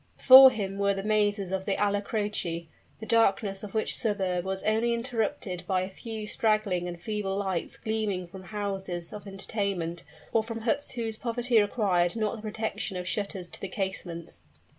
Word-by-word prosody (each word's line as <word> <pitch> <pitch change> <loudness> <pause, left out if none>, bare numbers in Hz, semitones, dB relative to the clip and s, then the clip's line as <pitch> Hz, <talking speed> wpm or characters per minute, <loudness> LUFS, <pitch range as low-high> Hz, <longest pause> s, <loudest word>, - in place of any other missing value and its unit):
Before 265 0 +10
him 200 -4 -4
were 200 0 +2
the 195 - -4
mazes 205 -2 +1
of 190 0 -2
the 200 - 0
Alla 205 0 +1
Croce, 200 -6 -2 0.3
the 220 - -7
darkness 200 -3 +2
of 210 0 -8
which 220 - +1
suburb 190 -5 0
was 190 0 -3
only 225 +2 +2
interrupted 225 -6 -2
by 185 -1 +1
a 185 +1 -4
few 220 +1 -6
straggling 210 -5 +1
and 175 -1 -6
feeble 200 0 -2
lights 190 -4 -2
gleaming 215 -4 -2
from 185 +2 -11
houses 190 -4 -4
of 210 -1 -8
entertainment, 195 -4 -3 0.3
or 225 - +4
from 230 0 -5
huts 235 +5 -1
whose 225 -3 -2
poverty 240 -1 +2
required 195 -4 +1
not 215 -1 -1
the 220 - -9
protection 215 -2 -3
of 180 0 -5
shutters 195 -2 -3
to - - -7
the 195 - -3
casements. 175 - -5
205 Hz, 175 wpm, -28 LUFS, 190-220 Hz, 0.3 s, Before